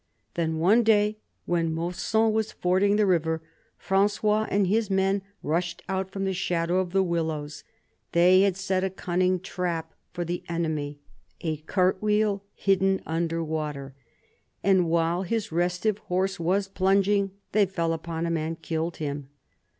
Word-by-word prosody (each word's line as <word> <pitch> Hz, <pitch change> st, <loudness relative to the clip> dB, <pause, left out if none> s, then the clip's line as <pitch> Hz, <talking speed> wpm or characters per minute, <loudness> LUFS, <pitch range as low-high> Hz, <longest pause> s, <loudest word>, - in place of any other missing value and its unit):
Then 160 Hz, -2 st, -1 dB
one 195 Hz, +9 st, +4 dB
day, 215 Hz, -1 st, +3 dB, 0.3 s
when 165 Hz, -2 st, 0 dB
Mausson 180 Hz, +7 st, 0 dB
was 220 Hz, 0 st, 0 dB
fording 190 Hz, +3 st, +2 dB
the 210 Hz, 0 st, +3 dB
river, 160 Hz, -3 st, +1 dB, 0.3 s
Frangois 210 Hz, +2 st, +1 dB
and 200 Hz, 0 st, +2 dB
his 215 Hz, +3 st, +1 dB
men 195 Hz, +1 st, +2 dB, 0.2 s
rushed 170 Hz, +3 st, -1 dB
out 190 Hz, -1 st, -2 dB
from 195 Hz, 0 st, -3 dB
the 190 Hz, -, 0 dB
shadow 175 Hz, 0 st, 0 dB
of 185 Hz, -1 st, -1 dB
the 195 Hz, +1 st, +3 dB
willows. 155 Hz, -4 st, -2 dB, 0.5 s
They 180 Hz, +2 st, +6 dB
had 195 Hz, -2 st, +2 dB
set 190 Hz, -1 st, 0 dB
a 190 Hz, -, +1 dB
cunning 185 Hz, 0 st, 0 dB
trap 170 Hz, -3 st, -3 dB, 0.2 s
for 175 Hz, -1 st, -3 dB
the 175 Hz, +1 st, -3 dB
enemy, 155 Hz, -4 st, -2 dB, 0.4 s
a 160 Hz, -2 st, -2 dB
cart 185 Hz, +5 st, 0 dB
wheel 210 Hz, -1 st, +1 dB
hidden 195 Hz, 0 st, +2 dB
under 165 Hz, 0 st, -1 dB
water, 150 Hz, -4 st, -4 dB, 0.7 s
and 185 Hz, -3 st, +3 dB
while 170 Hz, +1 st, +1 dB
his 215 Hz, +1 st, -2 dB
restive 180 Hz, +5 st, 0 dB
horse 190 Hz, 0 st, -1 dB
was 190 Hz, +4 st, +1 dB
plunging, 195 Hz, +1 st, +2 dB, 0.2 s
they 210 Hz, -2 st, +3 dB
fell 170 Hz, -3 st, -1 dB
upon 165 Hz, 0 st, -4 dB
him 170 Hz, 0 st, 0 dB
and 160 Hz, +1 st, -3 dB
killed 165 Hz, +1 st, -3 dB
him. 145 Hz, -2 st, -4 dB
180 Hz, 150 wpm, -26 LUFS, 165-195 Hz, 0.7 s, They